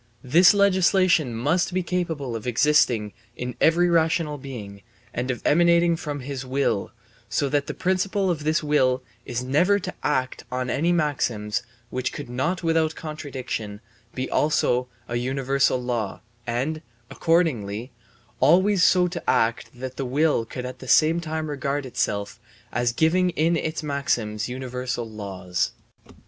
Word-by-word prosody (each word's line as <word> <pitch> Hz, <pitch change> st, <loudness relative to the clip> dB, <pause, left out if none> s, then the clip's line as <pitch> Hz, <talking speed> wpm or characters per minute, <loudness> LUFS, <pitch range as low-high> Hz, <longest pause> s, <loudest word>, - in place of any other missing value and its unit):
This 170 Hz, +8 st, +6 dB
legislation 185 Hz, -6 st, +3 dB
must 165 Hz, +10 st, 0 dB
be 185 Hz, -, +1 dB
capable 165 Hz, -8 st, -2 dB
of 115 Hz, +2 st, -6 dB
existing 125 Hz, -5 st, +3 dB, 0.2 s
in 125 Hz, 0 st, -4 dB
every 170 Hz, +2 st, +4 dB
rational 160 Hz, -3 st, +1 dB
being 105 Hz, -7 st, -8 dB, 0.3 s
and 125 Hz, +2 st, -3 dB
of 125 Hz, -, -3 dB
emanating 170 Hz, +1 st, +4 dB
from 145 Hz, -3 st, -5 dB
his 135 Hz, 0 st, -5 dB
will, 130 Hz, -6 st, -1 dB, 0.4 s
so 140 Hz, -, 0 dB
that 145 Hz, 0 st, 0 dB
the -, -, -4 dB
principle 190 Hz, +1 st, 0 dB
of 155 Hz, -3 st, -3 dB
this 155 Hz, +1 st, +1 dB
will 130 Hz, -4 st, +2 dB, 0.2 s
is 120 Hz, +1 st, -2 dB
never 165 Hz, +10 st, +3 dB
to 185 Hz, -2 st, -5 dB
act 130 Hz, -2 st, -1 dB
on 125 Hz, 0 st, -2 dB
any 165 Hz, +5 st, +1 dB
maxim 130 Hz, -10 st, 0 dB, 0.4 s
which 130 Hz, 0 st, -2 dB
could -, -, -7 dB
not 170 Hz, +9 st, -1 dB
without 160 Hz, -1 st, +1 dB
contradiction 130 Hz, -9 st, -5 dB, 0.4 s
be 130 Hz, -, -2 dB
also 125 Hz, -4 st, +1 dB, 0.2 s
a 120 Hz, -, -2 dB
universal 135 Hz, +1 st, +1 dB
law 120 Hz, -5 st, -3 dB, 0.3 s
and, 135 Hz, +7 st, -1 dB, 0.3 s
accordingly, 125 Hz, -, 0 dB, 0.5 s
always 180 Hz, +7 st, +4 dB
so 180 Hz, -1 st, +5 dB
to 175 Hz, 0 st, -4 dB
act 115 Hz, +1 st, +1 dB
that 130 Hz, +1 st, -7 dB
the -, -, -2 dB
will 140 Hz, -2 st, +1 dB
could 125 Hz, +2 st, -6 dB
at 125 Hz, -, -7 dB
the -, -, -10 dB
same 160 Hz, +2 st, +4 dB
time 160 Hz, -1 st, -3 dB
regard 140 Hz, -1 st, -2 dB
itself 100 Hz, -5 st, -2 dB, 0.3 s
as 120 Hz, +1 st, +1 dB
giving 170 Hz, +8 st, +2 dB
in 165 Hz, 0 st, +1 dB
its 160 Hz, 0 st, -2 dB
maxims 120 Hz, -7 st, -1 dB
universal 125 Hz, -1 st, -4 dB
laws. 95 Hz, -4 st, -3 dB
140 Hz, 145 wpm, -24 LUFS, 125-165 Hz, 0.5 s, This